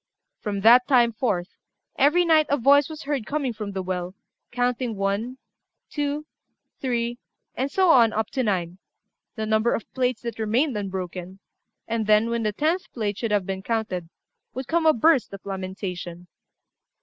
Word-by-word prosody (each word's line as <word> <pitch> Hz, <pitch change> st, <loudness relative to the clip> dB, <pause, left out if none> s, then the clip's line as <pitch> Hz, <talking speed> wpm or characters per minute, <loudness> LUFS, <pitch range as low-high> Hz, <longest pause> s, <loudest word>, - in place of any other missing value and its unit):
From 200 Hz, -2 st, -3 dB
that 240 Hz, +4 st, +7 dB
time 240 Hz, -4 st, +4 dB
forth, 195 Hz, -6 st, -2 dB, 0.4 s
every 305 Hz, +6 st, +4 dB
night 315 Hz, -2 st, +4 dB
a 285 Hz, -, +2 dB
voice 280 Hz, +3 st, +4 dB
was 315 Hz, 0 st, -8 dB
heard 275 Hz, -6 st, -2 dB
coming 280 Hz, -4 st, -1 dB
from 210 Hz, -2 st, -6 dB
the 190 Hz, -1 st, -3 dB
well, 180 Hz, 0 st, -4 dB, 0.4 s
counting 245 Hz, -1 st, -1 dB
one, 200 Hz, +6 st, -2 dB, 0.5 s
two, 295 Hz, 0 st, -2 dB, 0.5 s
three, 240 Hz, -2 st, -2 dB, 0.3 s
and 265 Hz, +2 st, -2 dB
so 375 Hz, -1 st, +4 dB
on 235 Hz, -6 st, +6 dB
up 220 Hz, 0 st, -2 dB
to 265 Hz, -, -1 dB
nine 185 Hz, -5 st, -1 dB, 0.6 s
the 220 Hz, -2 st, -3 dB
number 220 Hz, +2 st, +2 dB
of 230 Hz, -, -4 dB
the -, -, -48 dB
plates 250 Hz, -3 st, -1 dB
that 235 Hz, -1 st, -5 dB
remained 235 Hz, +5 st, +1 dB
unbroken 185 Hz, -2 st, -5 dB, 0.5 s
and 225 Hz, -2 st, -2 dB
then, 215 Hz, +2 st, +4 dB
when 235 Hz, 0 st, 0 dB
the 215 Hz, -1 st, 0 dB
tenth 320 Hz, -, -1 dB
plate 210 Hz, -4 st, -2 dB
should 230 Hz, -, -1 dB
have 205 Hz, -3 st, +1 dB
been 190 Hz, 0 st, -4 dB
counted, 190 Hz, -6 st, -2 dB, 0.5 s
would 260 Hz, 0 st, -5 dB
come 325 Hz, +2 st, +2 dB
a 315 Hz, -, +7 dB
burst 270 Hz, -3 st, +3 dB
of 195 Hz, -, -10 dB
lamentation. 185 Hz, -2 st, -6 dB
230 Hz, 170 wpm, -24 LUFS, 195-265 Hz, 0.6 s, that